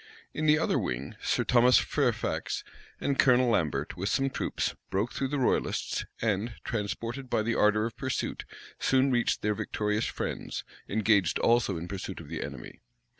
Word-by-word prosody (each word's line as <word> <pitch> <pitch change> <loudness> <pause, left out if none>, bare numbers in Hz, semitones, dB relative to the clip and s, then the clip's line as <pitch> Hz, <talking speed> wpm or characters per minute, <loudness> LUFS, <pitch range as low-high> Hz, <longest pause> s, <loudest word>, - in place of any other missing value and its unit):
In 155 +1 -1
the 150 0 +6
other 160 - +1
wing, 65 +2 -3
Sir - - +1
Thomas 125 0 +5
Fairfax - - 0 0.4
and 140 -1 -1
Colonel 125 -1 +5
Lambert, 75 -8 0
with 95 +3 -2
some 135 +4 +1
troops, - - -1 0.2
broke 105 +5 0
through 135 - -1
the 145 +2 -2
royalists; 130 - 0
and, 110 +1 -1
transported 115 +4 -3
by 110 - +1
the 115 +2 0
ardor 105 0 +3
of 115 - -5
pursuit, 130 -2 -3 0.4
soon 135 +1 +3
reached 120 -2 +1
their 105 0 +2
victorious 105 +1 -1
friends, - - -4 0.3
engaged 100 -4 +3
also 115 -6 +2
in 85 +2 -5
pursuit 95 0 -5
of 80 -4 -10
the 85 - -4
enemy. 70 -3 -7
110 Hz, 165 wpm, -29 LUFS, 100-125 Hz, 0.4 s, the